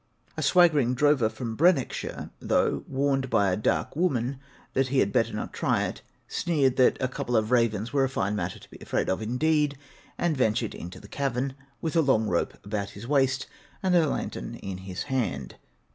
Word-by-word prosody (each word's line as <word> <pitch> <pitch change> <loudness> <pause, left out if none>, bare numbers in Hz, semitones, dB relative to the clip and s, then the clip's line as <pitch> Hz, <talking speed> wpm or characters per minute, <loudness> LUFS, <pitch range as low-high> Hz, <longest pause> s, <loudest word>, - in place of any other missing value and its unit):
A - - -3
swaggering 150 -9 +4
drover 145 -5 +3
from 115 -1 -5
Brecknockshire, 165 -2 +1
though - - +1
warned 135 -1 0
by 100 -5 +3
a - - +2
'dark 105 - 0
woman' 135 -6 0 0.3
that 135 0 +2
he 135 +1 -1
had 100 -6 +2
better - - +2
not - - -5
try - - +1
it, - - -4 0.3
sneered 140 -7 +1
that 130 - +5
'a 130 - +1
couple 125 -1 -1
of 110 +1 0
ravens 115 -2 +1
were 140 -2 +3
a 135 - +1
fine 100 -5 -1
matter 105 - -3
to - - -16
be - - -12
afraid - - -1
of 95 - -1
indeed!' 145 +5 +1 0.4
and 170 -3 +1
ventured 115 -3 +1
into 90 +2 -8
the 100 - -13
cavern, 135 +1 -2 0.3
with 160 0 -2
a 165 - +5
long 135 -7 +3
rope 85 - 0
about 100 -1 -3
his 105 +4 -10
waist, 135 -1 +2 0.4
and 185 -1 +3
a 165 -3 +5
lantern - - -4
in 95 -1 -6
his 95 -1 -5
hand. 105 - -2
130 Hz, 190 wpm, -27 LUFS, 110-140 Hz, 0.4 s, that